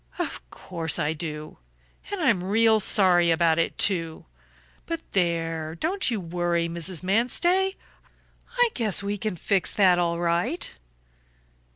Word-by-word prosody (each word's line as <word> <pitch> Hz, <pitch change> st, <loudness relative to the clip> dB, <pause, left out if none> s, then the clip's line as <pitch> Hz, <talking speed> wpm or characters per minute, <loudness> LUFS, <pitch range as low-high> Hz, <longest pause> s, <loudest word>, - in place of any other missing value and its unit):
"Of -, -, -4 dB
course 165 Hz, -, -3 dB
I 155 Hz, -2 st, 0 dB
do. 155 Hz, -1 st, -7 dB, 0.5 s
And 405 Hz, -, -3 dB
I'm 230 Hz, -, +2 dB
real 220 Hz, +3 st, +3 dB
sorry 180 Hz, -4 st, +4 dB
about 165 Hz, -1 st, +2 dB
it, 165 Hz, -, -1 dB
too. 165 Hz, -5 st, 0 dB, 0.6 s
But 330 Hz, -1 st, -3 dB
there, 165 Hz, -3 st, -1 dB
don't 370 Hz, -, -1 dB
you 230 Hz, -4 st, -1 dB
worry, 175 Hz, -1 st, -1 dB
Mrs. 170 Hz, 0 st, -3 dB
Manstey. 345 Hz, -, +1 dB, 0.8 s
I 485 Hz, -1 st, +4 dB
guess 215 Hz, -5 st, +1 dB
we 205 Hz, 0 st, -3 dB
can 215 Hz, -2 st, -3 dB
fix 190 Hz, +3 st, -1 dB
that 185 Hz, -3 st, +4 dB
all 170 Hz, -1 st, 0 dB
right." 175 Hz, -, -1 dB
180 Hz, 135 wpm, -25 LUFS, 170-220 Hz, 0.8 s, sorry